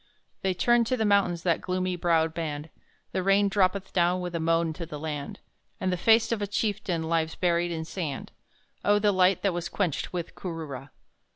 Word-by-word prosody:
They 190 -1 0
turn 240 +5 +4
to 255 +2 0
the 220 - +1
mountains, 195 -5 +2
that 170 -2 +1
gloomy 185 0 -1
browed 165 -2 +2
band; 155 -2 -4 0.4
The 185 - -1
rain 195 +2 +3
droppeth 190 0 +1
down 180 0 +2
with 180 -1 -4
a 170 - -1
moan 165 0 +1
to 170 +1 -6
the 150 - -6
land, 150 -2 -5 0.4
And 185 -1 0
the - - +2
face 225 +5 +4
of 225 -3 0
a 205 - -1
chieftain 200 -5 -1
lies 160 0 0
buried 175 -1 +1
in 160 -1 -3
sand 160 -5 -5 0.5
Oh, 205 0 +4
the 205 0 +3
light 185 0 +3
that 195 -3 +2
was 175 0 -3
quenched 180 -8 -1
with 175 -2 -4
Kooroora! 155 -7 -6
180 Hz, 195 wpm, -27 LUFS, 165-195 Hz, 0.5 s, turn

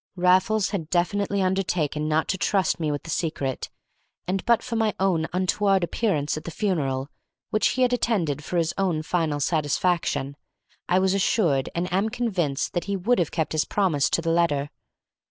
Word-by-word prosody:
Raffles 185 +4 +3
had 165 -7 -3
definitely 200 +3 0
undertaken 175 -5 0
not 155 +1 +1
to 190 - 0
trust 190 -5 +1
me 155 -2 0
with 145 - -4
the 165 - -6
secret, 150 -6 -2 0.6
and, 185 +2 -2
but 235 -1 +3
for 245 -2 -4
my 220 -2 +1
untoward 185 +2 +1
appearance 170 -6 0
at 155 - -6
the - - -6
funeral 145 -9 -1 0.4
(which 215 - +3
he 255 - +1
had 250 0 +2
attended 175 - 0
for 180 - -3
his 165 -1 +1
own 175 -5 0
final 160 -3 -1
satisfaction), 145 -2 0 0.5
I 180 - +4
was 190 0 +2
assured 175 - +1
and 170 +1 0
am 195 +4 +1
convinced 195 - -1
that 175 - -2
he 200 0 -1
would 225 +6 +1
have 170 - +1
kept 160 -3 -2
his 155 -2 +1
promise 175 -9 +1
to 165 - 0
the 165 - +1
letter. 150 -4 +1
175 Hz, 175 wpm, -25 LUFS, 155-195 Hz, 0.6 s, I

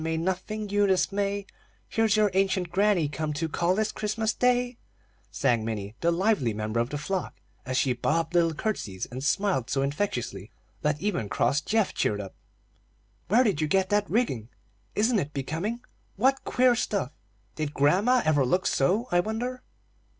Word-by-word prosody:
May 160 0 -1
nothing 190 +5 -2
you 205 0 +3
dismay; 200 +1 0 0.4
Here's 220 -1 +2
your 210 -2 +3
ancient 190 -2 +1
granny 190 -4 +3
come 150 +1 -3
To 160 +3 -2
call, 175 +3 +1
this 215 +1 0
Christmas 215 +1 -1
day," 245 -1 +1 0.5
sang 115 -3 +1
Minnie, 105 -2 -4
the 170 - +3
lively 170 - +1
member 110 +2 -2
of 120 +1 0
the 145 - -3
flock, 185 +5 -3 0.3
as 130 0 -1
she 130 -2 +2
bobbed 160 +7 -1
little 165 -2 +3
curtseys 110 - -3
and 130 +2 -7
smiled 185 - +1
so 135 0 +1
infectiously 125 - -3 0.3
that 150 0 0
even 195 - -2
cross 150 - +1
Geoff 220 +5 +1
cheered 105 - 0
up. 95 -2 -7 0.9
"Where 235 +6 +5
did 195 - +1
you 155 - +1
get 190 +4 +2
that 205 0 +2
rigging?" 130 - 0 0.5
"Isn't 220 +1 +3
it 150 -3 -4
becoming?" 165 - -3 0.3
"What 265 +6 +2
queer 250 0 +4
stuff!" 200 - -1 0.4
"Did 155 -2 -3
grandma 200 - +3
ever 145 -3 +3
look 180 +9 +1
so, 195 - +2
I 175 - +4
wonder?" 240 +6 -2
180 Hz, 165 wpm, -27 LUFS, 140-210 Hz, 0.9 s, Where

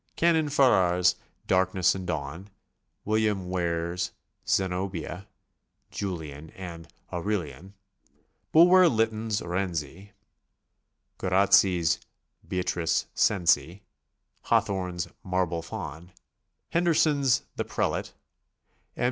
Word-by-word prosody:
Canon 160 -3 +2
Farrar's 90 -11 +4 0.3
"Darkness 95 -1 +2
and 95 -2 -6
Dawn," 80 +4 -4 0.6
William 105 -4 0
Ware's 85 0 -2 0.3
"Zenobia,'' 95 0 -2 0.6
"Julian," 80 -6 -5
and 85 -3 -8 0.3
"Aurelian"; 95 0 -4 0.8
Bulwer 180 +3 +7
Lyttcn's 110 -2 0
"Rienzi," 90 +1 -4 1.1
Guer 95 - -2
razzi's 95 -3 +4 0.5
"Beatrice 90 -2 0
Cenci," 90 -3 +2 0.6
Hawthorne's 90 -3 0 0.2
"Marble 90 -2 -1
Faun," 85 +1 -8 0.6
Hen 170 +1 +1
derson's 150 -6 +3
"The - - -1
Prelate," - - -2 0.8
M. - - -15
95 Hz, 80 wpm, -27 LUFS, 85-105 Hz, 1.1 s, Bulwer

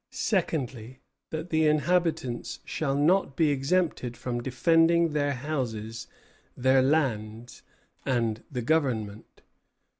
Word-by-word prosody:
Secondly, 140 - -2 0.3
that 160 +2 -5
the 160 -1 +3
inhabitants 155 -5 0
shall 140 -3 -2
not 150 0 +2
be 160 -3 +3
exempted 140 -4 0
from 120 0 -3
defending 165 +6 +3
their 145 -1 0
houses, 120 -5 -4 0.5
their 130 +1 +4
lands, 120 -5 -1 0.4
and 115 -4 -1
the 125 -3 -3
Government. 115 -8 -1
135 Hz, 100 wpm, -27 LUFS, 120-160 Hz, 0.5 s, their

